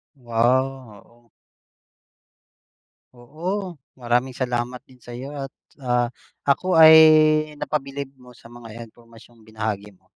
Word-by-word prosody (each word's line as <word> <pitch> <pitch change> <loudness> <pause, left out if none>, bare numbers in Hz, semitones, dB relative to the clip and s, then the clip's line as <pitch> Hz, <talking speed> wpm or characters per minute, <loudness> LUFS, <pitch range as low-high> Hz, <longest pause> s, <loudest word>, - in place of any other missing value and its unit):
Wow, 125 -1 -1
oo. 120 0 -27 1.9
Oo. 175 +10 -6 0.2
Maraming 120 +1 0
salamat 125 -1 -3
din 130 -2 -22
sa'yo 125 +4 -9
at 135 -1 -7 0.3
ah, 120 -1 0 0.4
ako 165 +5 +1
ay 160 0 +9 0.6
napabilib 140 -2 -4
mo 125 -2 -18
sa 120 - -18
mga 115 -1 -11
impormasyong 115 0 -20
binahagi 110 -2 -5
mo. - - -33
125 Hz, 105 wpm, -22 LUFS, 115-135 Hz, 1.9 s, ay